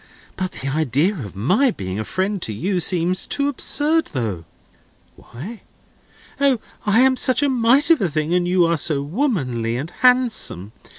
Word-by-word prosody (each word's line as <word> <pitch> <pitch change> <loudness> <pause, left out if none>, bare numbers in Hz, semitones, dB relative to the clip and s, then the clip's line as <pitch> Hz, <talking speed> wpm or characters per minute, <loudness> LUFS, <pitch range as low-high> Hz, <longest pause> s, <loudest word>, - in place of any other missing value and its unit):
But 185 -1 -4
the 135 - -6
idea 155 - +1
of 115 - -8
my 185 - +2
being 95 - -5
a - - -2
friend 190 - -2
to 110 - -2
you 180 - -2
seems 180 +1 +1
too 280 0 +1
absurd, 300 +3 +2
though." 105 - -3 0.7
"Why?" 195 - -10 0.8
"O, 275 -4 +2 0.3
I 215 +4 +4
am 260 0 +4
such 255 +1 +1
a 285 - +2
mite 260 +5 +3
of 325 - +4
a 190 - +1
thing, 155 +2 -2
and 180 0 +1
you 180 -1 +3
are 170 0 +1
so 145 -2 +2
womanly 140 - -2
and 150 +7 -6
handsome. 245 - +1
180 Hz, 170 wpm, -20 LUFS, -, 0.8 s, I